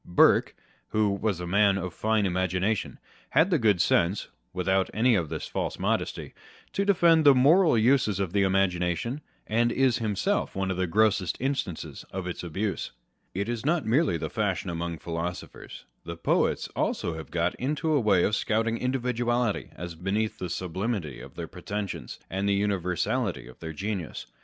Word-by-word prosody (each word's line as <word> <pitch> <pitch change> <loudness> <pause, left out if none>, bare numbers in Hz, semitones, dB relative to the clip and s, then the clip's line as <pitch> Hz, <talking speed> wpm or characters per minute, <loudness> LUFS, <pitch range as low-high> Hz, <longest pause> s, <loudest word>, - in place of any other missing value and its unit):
Burke, 90 - +4 0.3
who 105 -1 +1
was 100 -2 -1
a 90 - -4
man 100 +2 +3
of 90 -2 -4
fine 110 -1 +1
imagination, 95 +3 0 0.3
had 180 +5 +3
the 165 - +3
good 105 -6 +3
sense 85 +4 +2 0.2
(without 95 +1 +1
any 120 +3 +4
of 85 -8 +1
this 80 -1 -4
false - - -3
modesty) - - -2 0.4
to 200 - +1
defend 170 -5 +4
the 140 -2 +7
moral 155 +3 +5
uses 110 -4 +3
of 95 -3 -2
the 100 - +3
imagination, 95 - 0 0.2
and 120 +2 +2
is 130 -1 +2
himself 115 - -1
one 95 0 -1
of 90 - -3
the 95 -1 0
grossest 100 -2 +2
instances 130 - -3
of 95 -1 -5
its 90 - -4
abuse. 95 +4 -3 0.5
It 100 +3 -1
is 120 -2 -3
not 160 +3 +1
merely 120 - +2
the 80 0 -3
fashion 100 -3 -1
among 85 0 -3
philosophers 85 +2 -6
â€" - - -43
the 85 0 -6
poets - - +1
also 85 - -1
have 80 0 -8
got 85 +1 0
into 150 +4 0
a 145 - +4
way 100 -6 +3
of 105 - +2
scouting 115 +1 0
individuality 120 -3 0
as 85 0 -6
beneath 100 +6 -2
the 90 - -4
sublimity 90 - -3
of - - -12
their - - -5
pretensions, 100 -2 -5
and 95 +2 -1
the 100 0 +2
univer 95 -4 -1
sality 110 - -1
of 65 - -14
their 80 -1 -6
genius. 95 0 -4
100 Hz, 175 wpm, -27 LUFS, 90-120 Hz, 0.5 s, the